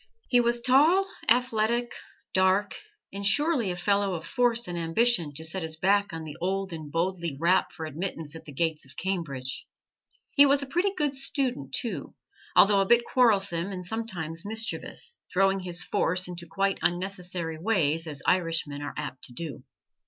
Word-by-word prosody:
He 245 - +4
was 240 0 +1
tall, 305 +10 +5 0.2
athletic, 235 0 +2 0.4
dark, 190 +2 +2 0.4
and 200 0 -5
surely 280 - +2
a 180 - -2
fellow 200 +1 +1
of 165 -1 -6
force 240 -3 +1
and 175 - -4
ambition 170 +1 +2
to 160 +2 -2
set 185 +4 -3
his 160 -1 -5
back 200 +5 +2
on 165 -1 -6
the 150 -2 -8
old 190 0 -1
and 155 -3 -7
boldly 170 -2 -1
rap 175 +3 +3
for 160 - -6
admittance 160 -1 -5
at 160 - -10
the 150 - -9
gates 160 +2 -1
of 130 - -15
Cambridge. 150 -9 -3 0.6
He 285 - +7
was 280 0 +3
a - - -4
pretty 350 +8 +1
good 290 -2 0
student, 255 - -2
too, 235 -3 -4 0.4
although 200 0 +6
a 195 - 0
bit 235 +1 +5
quarrelsome 200 -7 +2
and 180 -2 -6
sometimes 175 -6 -4
mischievous 225 - -2
throwing 195 +1 +3
his 175 -2 -4
force 180 +2 0
into 175 -1 -8
quite 195 +4 0
unnecessary 175 -2 -2
ways, 165 -5 +1
as 145 -3 -7
Irishmen 165 -5 +1
are 145 - -5
apt 140 -4 -5
to 125 - -11
do. 145 -2 -6
185 Hz, 170 wpm, -27 LUFS, 165-225 Hz, 0.6 s, He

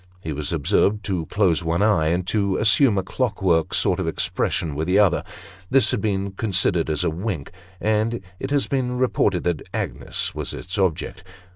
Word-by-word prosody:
He 80 - -3
was 75 0 -4
observed, 100 +6 +1
to 90 -6 -2
close 90 -5 +1
one 85 +4 +1
eye, 100 -8 +3
and 85 +2 0
to 100 -1 0
assume 110 +1 +4
a 95 - +1
clock 110 +2 -2
work 85 -4 +2
sort - - +1
of - - -2
expression 80 -3 -1
with 80 +3 -3
the 95 +2 +3
other; 100 -5 +4 0.5
this 135 0 +3
has 125 - 0
been 100 -1 -1
considered 90 -5 0
as 75 -2 0
a - - +1
wink, 85 -3 -4 0.3
and 110 +2 0 0.2
it 135 - -4
has 145 -1 +1
been 125 -2 -1
reported 105 -7 +1
that 85 -3 -1
Agnes - - -3
was - - -5
its 95 +3 -5
object. 85 -3 -1
95 Hz, 185 wpm, -23 LUFS, 85-110 Hz, 0.5 s, assume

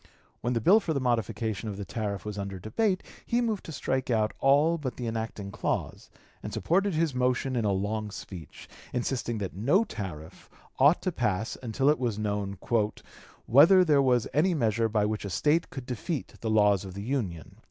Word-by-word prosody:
When 120 +2 -1
the 115 - 0
bill 200 - +6
for 170 -7 -2
the - - +1
modification 115 -4 -1
of 100 - -6
the 100 - -5
tariff 100 -1 -4
was 105 -1 -5
under 100 -1 -4
debate, 185 - 0 0.2
he 235 - 0
moved 225 -5 -1
to - - -7
strike 130 -3 -2
out 110 -2 +1
all 145 +5 +4
but 130 -4 -4
the 125 - -4
enacting 110 -3 -4
clause, 100 - -3 0.3
and - - -6
supported 195 +1 +1
his 160 -2 +1
motion 125 +1 0
in 115 -3 0
a 100 - +2
long 105 +2 -2
speech, 95 -6 -10 0.3
insisting 120 -1 -2
that 100 -3 -4
no 140 - +3
tariff 90 - -8 0.3
ought 145 +6 +5
to 185 - 0
pass 110 - -1
until 130 +3 -1
it 150 +1 +4
was 120 -5 -1
known 100 -2 -2 0.9
"whether 170 +9 +7
there 145 -4 +4
was 125 -4 +2
any 170 +6 +3
measure 115 -4 +1
by 105 -1 +1
which 105 0 -2
a 100 - -4
State 150 - +1
could 135 -3 -7
defeat 130 +5 -4
the 115 - -2
laws 105 -3 +4
of 95 -1 -8
the 100 - -5
Union." 105 - -3
115 Hz, 195 wpm, -28 LUFS, 105-145 Hz, 0.9 s, whether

